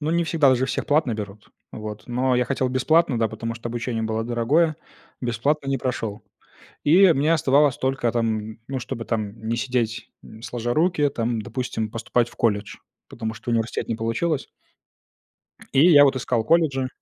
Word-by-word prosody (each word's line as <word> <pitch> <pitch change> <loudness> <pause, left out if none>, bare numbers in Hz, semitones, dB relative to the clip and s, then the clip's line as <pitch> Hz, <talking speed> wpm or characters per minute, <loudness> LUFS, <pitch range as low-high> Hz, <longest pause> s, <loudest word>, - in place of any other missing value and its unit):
Ну, 155 +1 -1
не 170 0 +1
всегда. 160 -4 +3
Л 130 - +5
же 130 +2 0
всех - - -3
платно 145 -6 +2
берут, 105 -1 -8 0.2
вот, 105 -1 -7
но 125 +1 0
я 125 - +2
хотел 130 0 -1
бесплатно, 130 0 +2
да, 115 -1 +1
потому 115 +2 -5
что 115 +1 -6
обучение 115 -1 -3
было 110 0 -2
дорогое, 145 +7 +1 0.4
бесплатно 135 +4 -1
не 135 -1 0
прошёл. 115 -4 -3 0.6
И 175 +4 +6
мне 150 +4 +2
оставалось 140 -2 +3
только 130 -3 0
там, 110 -2 -2
ну, 135 -1 -3
чтобы 115 -1 -5
там 110 -2 -3
не 115 - 0
сидеть, 115 0 -2
м, 110 +1 -14
сложа 120 0 -3
руки, 160 -2 +2
там, 115 -4 -2
допустим, 115 -2 -4
поступать 120 +1 0
в - - -18
колледж, 105 -3 0 0.3
потому 110 -1 -5
что 110 +3 -6
университет 115 -1 -1
не 115 - -1
получилось. 125 +7 -1 1.2
И 150 +6 +6
я, 145 -2 +8
вот, 135 -1 +2
искал 120 -2 -1
колледжи 135 -3 +2
120 Hz, 175 wpm, -23 LUFS, 115-140 Hz, 1.2 s, я